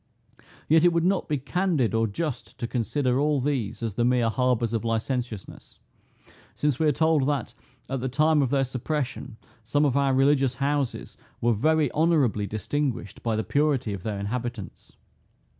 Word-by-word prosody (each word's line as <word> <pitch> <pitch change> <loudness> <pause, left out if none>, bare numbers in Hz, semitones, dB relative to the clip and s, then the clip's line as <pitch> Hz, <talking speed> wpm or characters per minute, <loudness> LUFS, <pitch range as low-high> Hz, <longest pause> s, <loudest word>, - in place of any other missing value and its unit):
Yet 160 +1 +5
it 175 - +6
would 170 -1 +1
not 190 -1 +1
be 150 - +1
candid 150 - 0
or 115 0 +2
just 125 +4 -5
to - - -3
consider 125 +2 0
all 150 0 +2
these 130 -6 -2
as 115 -3 -2
the 120 - 0
mere 120 -1 +2
harbors 125 -2 +1
of 115 - -1
licentiousness; 115 -2 -4 0.8
since 145 -4 0
we 160 - +3
are - - +5
told 155 -2 +2
that, 140 -5 -1 0.3
at 135 0 -3
the 130 +2 -2
time 155 +3 +3
of 135 - +1
their 135 0 +2
suppression, 130 -1 -4 0.3
some 145 +6 +1
of 140 -3 +1
our 140 -1 +2
religious 135 -1 +3
houses 140 0 -2 0.2
were 120 0 +2
very 155 +5 +2
honorably 145 -11 +2
distinguished 115 +4 -3
by 115 -2 -1
the 110 - -1
purity 135 -2 +1
of 95 - -6
their 105 +1 -3
inhabitants. 115 0 -5
130 Hz, 170 wpm, -26 LUFS, 115-145 Hz, 0.8 s, it